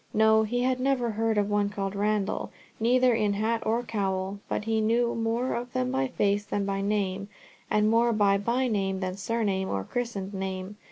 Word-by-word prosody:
No; 220 0 +5
he 245 +3 0
had 255 0 +1
never 255 -3 +1
heard 220 0 0
of 205 -1 +2
one 205 -1 +1
called 195 -1 -3
Randall, 210 0 0 0.3
neither 250 +2 +4
in 210 -3 +1
hat 225 +3 0
nor 230 +2 +1
cowl, 195 -3 -2
but - - -1
he 220 -1 +1
knew 235 +2 +2
more 230 +3 -1
of 245 +1 -4
them 255 0 0
by 265 0 +1
face 205 -4 +1
than 205 -1 -2
by 195 0 -1
name, 200 -1 -1 0.4
and 210 0 +3
more 230 +2 +3
by 200 -2 +3
byname 205 -4 0
than 185 0 -2
surname 200 -2 -1
or 95 -1 -1
christened 210 - -4
name. 190 +1 -4
215 Hz, 185 wpm, -27 LUFS, 200-235 Hz, 0.4 s, No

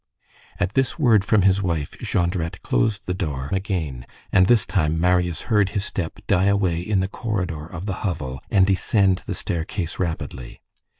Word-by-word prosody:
At 90 +3 0
this 135 -2 +1
word 115 - +4
from 105 -1 +3
his 95 0 +4
wife, 85 -6 -2
Jondrette 85 -1 -1
closed 100 - 0
the 90 - -1
door 70 -7 -3
again, 85 - -2 0.2
and 95 -1 +5
this 120 -1 +4
time, 80 -4 0
Marius 90 -1 +2
heard 105 -4 +2
his 100 - +1
step 85 -6 -3
die 90 +2 +3
away 100 -4 +2
in 95 +1 0
the 95 - 0
corridor 90 -8 -3
of 85 +2 -7
the 95 -2 -3
hovel, 75 -9 -3
and 95 -1 +4
descend 95 0 +2
the - - -2
staircase 85 +1 -3
rapidly. 80 -8 -4
90 Hz, 170 wpm, -23 LUFS, 80-100 Hz, 0.2 s, and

